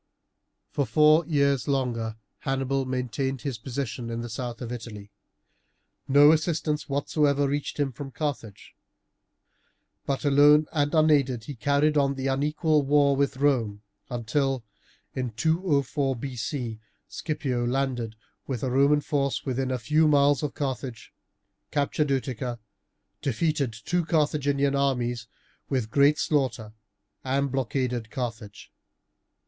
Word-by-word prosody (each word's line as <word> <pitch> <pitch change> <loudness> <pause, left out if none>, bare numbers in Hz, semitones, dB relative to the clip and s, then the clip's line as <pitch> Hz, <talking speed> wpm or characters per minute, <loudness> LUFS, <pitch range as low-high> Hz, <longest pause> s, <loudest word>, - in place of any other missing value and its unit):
For 140 - -1
four 155 +1 +5
years 140 -4 +2
longer 120 -5 -1 0.2
Hannibal 135 0 -1
maintained 130 +1 -2
his 135 -6 -4
position 120 -2 -4
in 115 0 -3
the 120 - -6
south 120 +1 -5
of 120 -2 -6
Italy. 110 -4 -8 1.0
No 145 +2 +7
assistance 155 -2 0
whatever 145 0 +1
reached 145 +2 -3
him 140 -2 +1
from 135 +3 -7
Carthage, 135 -8 -5 1.3
but 140 +1 -1
alone 145 +2 +6
and 145 0 0
unaided 140 -7 +3
he 145 - -7
carried 145 +4 +2
on 140 -1 +2
the 135 0 -4
unequal 150 +3 +1
war 140 0 +3
with 140 -1 0
Rome 120 -8 +1 0.3
until, 130 +2 -1 0.5
in 125 -3 -3
204 145 - 0
B.C., 125 -2 -4 0.3
Scipio 140 -6 -2
landed 120 -3 -1 0.3
with 125 -4 -3
a 130 - -1
Roman 140 +3 +4
force 140 -1 -1
within 130 -1 -1
a 130 - 0
few 150 +6 +2
miles 145 -2 +4
of 150 - -3
Carthage, 130 -4 -4 0.6
captured 145 0 0
Utica, 130 -3 -2 0.6
defeated 140 0 0
two 175 +11 -2
Carthaginian 145 -3 +1
armies 120 -4 0 0.4
with 125 -5 -1
great 145 +3 +4
slaughter, 120 -7 -1 0.5
and 135 +1 0
blockaded 125 -3 -2
Carthage. 115 -5 -6
135 Hz, 120 wpm, -26 LUFS, 125-145 Hz, 1.3 s, No